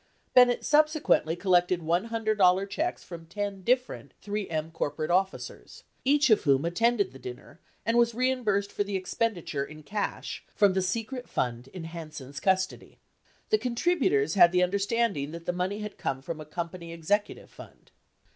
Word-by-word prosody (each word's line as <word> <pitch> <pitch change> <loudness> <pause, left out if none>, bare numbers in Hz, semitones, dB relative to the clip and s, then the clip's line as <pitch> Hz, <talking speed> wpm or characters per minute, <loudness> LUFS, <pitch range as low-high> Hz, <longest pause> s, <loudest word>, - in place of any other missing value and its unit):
Bennett 245 -1 +5
subsequently 300 - +3
collected 180 -1 +2
$100 200 +1 +2
checks 330 - -2
from 165 -2 -10
ten 200 +2 -4
different 250 +5 -1
3 205 -1 -4
M 160 0 -3
corporate 155 0 -2
officers, 190 +2 -2 0.2
each 285 -1 +3
of 215 - +5
whom 140 0 +3
attended 210 +3 +1
the 135 - -13
dinner 125 +6 -10 0.3
and 230 +1 +3
was 235 -1 +3
reimbursed 235 -6 0
for - - -1
the 200 -1 -4
expenditure 185 -6 -2
in 155 +2 -10
cash 205 +7 -4
from 200 -2 +4
the 190 - +1
secret 230 +7 -3
fund 120 0 -2
in 170 +5 -9
Hansen's 155 -5 -8
custody. 190 +1 -1 0.5
The 430 - +4
contributors 235 - +1
had 175 -3 +7
the 180 0 +3
understanding 200 -4 0
that 170 0 -8
the 180 - -1
money 185 +4 -2
had 210 0 -7
come 135 0 -3
from 160 +1 -5
a - - -8
company 170 +2 -6
executive 185 +6 -2
fund. - - -15
190 Hz, 155 wpm, -28 LUFS, 165-225 Hz, 0.5 s, had